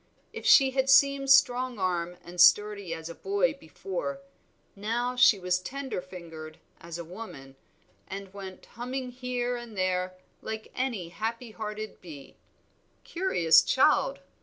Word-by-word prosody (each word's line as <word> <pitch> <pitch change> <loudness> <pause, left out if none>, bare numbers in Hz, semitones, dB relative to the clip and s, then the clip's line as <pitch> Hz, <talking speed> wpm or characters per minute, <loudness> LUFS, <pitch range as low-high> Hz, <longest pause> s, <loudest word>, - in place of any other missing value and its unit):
If - - -5
she 270 -2 +7
had 265 0 0
seemed 275 0 +5
strong 255 -2 +4
armed 180 -2 -2
and 175 +1 -2
sturdy 200 0 +4
as 160 -1 -5
a 170 - -7
boy 405 - 0
before, 385 - -6 0.6
now 235 +5 -2
she 250 -4 +6
was 180 -1 0
tender 265 +2 -5
fingered 165 -4 -10 0.2
as 170 0 -8
a 170 - -7
woman, 160 -8 -10 0.5
and 195 0 -8
went 190 -2 -9
humming 250 +2 -5
here 245 -1 -3
and 235 -3 -10
there 185 0 -1 0.3
like 220 0 -6
any 235 -10 -3
happy 225 +5 -4
hearted 215 0 -6
bee. 145 -6 -11 0.7
"Curious 255 - +4
child!" - - +2
215 Hz, 135 wpm, -28 LUFS, 180-255 Hz, 0.7 s, she